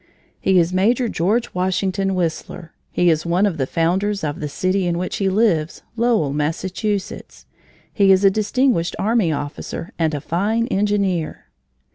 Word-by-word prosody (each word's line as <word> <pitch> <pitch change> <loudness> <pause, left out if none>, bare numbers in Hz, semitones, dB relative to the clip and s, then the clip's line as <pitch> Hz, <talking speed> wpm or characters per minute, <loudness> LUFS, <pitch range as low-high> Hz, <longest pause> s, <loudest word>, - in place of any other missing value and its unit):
"He 190 -1 +2
is 175 +1 +2
Major 230 +7 +2
George 215 +5 0
Washington 190 +1 0
Whistler. 170 -1 -4 0.2
He 175 -1 +3
is 155 -1 0
one 175 +4 +2
of 190 -5 -1
the 135 - 0
founders 190 +6 0
of 145 -1 -3
the 150 - -4
city 185 +4 0
in 170 -1 0
which 180 +1 -3
he 195 -1 +1
lives, 185 -6 +1
Lowell, 225 - +1
Massachusetts. 185 +7 -3 0.5
He 200 -2 +4
is 190 +1 +4
a 195 - +6
distinguished 215 -3 +1
army 215 -5 +1
officer 145 +3 -5
and 160 -2 +1
a - - -2
fine 205 +10 0
engineer." 195 -6 -1
185 Hz, 155 wpm, -20 LUFS, 165-205 Hz, 0.5 s, a